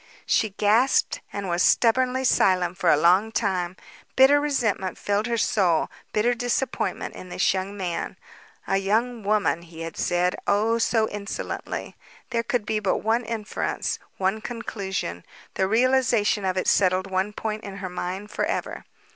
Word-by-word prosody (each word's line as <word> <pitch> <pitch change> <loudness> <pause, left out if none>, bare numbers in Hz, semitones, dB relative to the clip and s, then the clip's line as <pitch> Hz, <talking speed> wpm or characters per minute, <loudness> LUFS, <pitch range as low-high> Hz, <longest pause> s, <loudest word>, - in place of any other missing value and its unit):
She 220 - +2
gasped 215 +6 +2
and 200 -1 -4
was 175 0 0
stubbornly 255 +5 +3
silent 185 -7 +3
for 175 - +3
a 150 - +6
long 180 +7 +4
time. 185 -5 -1 0.4
Bitter 275 +2 +6
resentment 230 -10 -1
filled 205 +2 0
her 235 -1 0
soul, 185 -7 +2 0.2
bitter 225 +3 +2
disappointment 245 +2 -2
in 185 - -10
this 180 - +2
young 195 +2 -4
man. 180 -3 -3 0.5
"A 195 - +1
young 225 +5 0
woman!" 205 -4 +1
he 165 -1 -11
had 165 -1 -6
said, 180 0 +1
oh, 220 +3 +2
so 225 -1 +2
insolently. 205 0 -5 0.4
There 230 - +1
could 235 -1 -1
be 215 0 0
but 195 -3 +1
one 225 +3 +1
inference, 220 -2 -3 0.2
one 195 +3 0
conclusion. 195 - -4 0.3
The 190 - +1
realization 230 -3 +2
of 185 0 0
it 185 - -1
settled 185 -1 +3
one 190 +1 -1
point 215 +1 -4
in 200 -1 -7
her 190 -2 -5
mind 185 +3 -5
forever. - - -3
205 Hz, 155 wpm, -25 LUFS, 185-230 Hz, 0.5 s, a